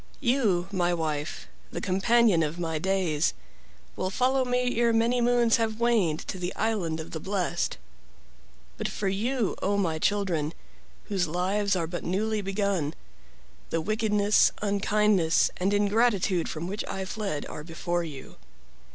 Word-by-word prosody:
"You, 235 - +2
my 175 -2 +1
wife, 155 -2 -3 0.2
the - - -5
companion 200 0 +3
of 155 +1 -1
my 165 -2 -2
days, 180 -4 +1 0.6
will 185 - -2
follow 260 +6 +2
me 250 -1 0
ere 235 -1 +4
many 235 +2 +2
moons 240 -1 +4
have 225 -1 -1
waned 215 -10 +2
to 190 - -6
the 180 +1 -3
island 200 -8 -1
of 160 - -7
the 160 - -4
blessed. 180 -1 -1 1.0
But - - -1
for 200 - -3
you, 225 +3 0
0 200 +1 +1
my 165 -5 0
children, 170 -6 0 0.5
whose 190 -4 -1
lives 195 +5 0
are 170 -2 0
but 175 +2 -5
newly 210 +4 0
begun, 195 -6 -1 0.7
the 165 - 0
wickedness, 210 +2 +3
unkindness, 200 -4 +2
and 190 +2 +1
ingratitude 205 -3 +2
from 155 +1 -4
which 200 +4 -3
I 190 0 -3
fled 190 -7 -3
are 150 - -7
before 170 +1 -2
you. 145 -5 -9
195 Hz, 145 wpm, -27 LUFS, 170-220 Hz, 1.0 s, ere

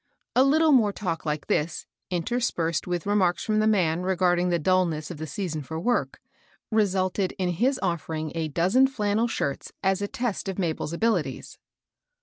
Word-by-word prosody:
A 255 - +6
little 310 +3 +4
more 225 -7 +5
talk 170 -6 -4
like 150 -1 -2
this, 155 +2 -1 0.2
interspersed 175 -3 -1
with 175 -2 -2
remarks 195 -4 +2
from 215 -1 +1
the 215 - +3
man 175 -6 +2
regarding 180 -1 +2
the 175 - +2
dulness 170 -2 +1
of 175 - -7
the 155 +1 -5
season 160 -1 -3
for 160 +4 -5
work, 185 - 0 0.5
resulted 195 -3 +1
in 185 -2 -2
his 250 +10 +1
offering 160 -2 -2
a 165 -1 -2
dozen 185 - +3
flannel 215 -3 0
shirts 140 -11 -3
as 190 0 +1
a 205 - -1
test 230 -3 -3
of 190 - -4
Mabel's 165 -3 -2
abili 215 -3 +2
ties. - - -13
185 Hz, 170 wpm, -26 LUFS, 165-215 Hz, 0.5 s, A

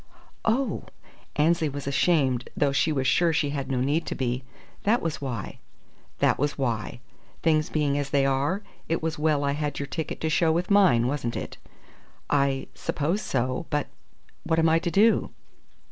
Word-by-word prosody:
"Oh!" 250 +5 0 0.5
Annesley 160 +1 +2
was 140 0 -6
ashamed, 135 -4 +1
though 145 -1 +2
she 145 +3 +2
was 135 -3 0
sure 170 +6 +3
she 150 -2 0
had 140 -2 -3
no 130 -2 0
need 145 +5 0
to - - -3
be. 125 0 -2 0.4
"That 225 +4 +3
was 165 -3 -3
why!" 125 -7 -5 0.6
"That - - +2
was 145 +1 0
why. 120 -3 -2 0.4
Things 155 -2 +2
being 145 -2 +1
as 140 -1 -3
they 140 -1 +2
are, 140 +9 0 0.3
it 165 0 0
was 160 -1 -2
well 150 -2 +2
I 140 - +1
had 145 0 -2
your 140 - -2
ticket 160 +2 -4
to 160 - 0
show 160 0 +3
with 175 +4 -1
mine, 185 -13 +5
wasn't 125 -3 -2
it?" - - -6 0.7
"I 140 -2 +2
suppose 170 +9 -1
so. 130 +4 -1
But 145 -1 -1 0.5
what 165 - 0
am 165 0 +4
I 165 +1 +4
to 170 - -2
do?" 215 +6 +3
145 Hz, 175 wpm, -26 LUFS, 135-165 Hz, 0.7 s, mine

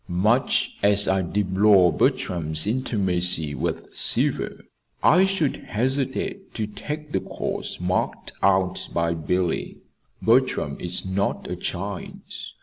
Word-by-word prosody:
Much 105 +8 +1
as 100 0 +5
I 95 0 +2
deplore 95 0 +3
Bertram's 80 -3 0
intimacy 90 - 0
with 65 - -4
Seaver, - - +3 0.4
I 180 +4 +6
should 190 -7 0
hesitate 130 +4 -2
to 110 - -1
take 150 +8 -7
the - - +1
course - - -5
marked 90 +1 -2
out 95 -1 +1
by 85 0 +1
Billy. 85 +2 -2 0.4
Bertram 115 - +2
is 90 +1 0
not 95 +2 -2
a - - -4
child. - - -5
95 Hz, 115 wpm, -24 LUFS, 90-115 Hz, 0.4 s, I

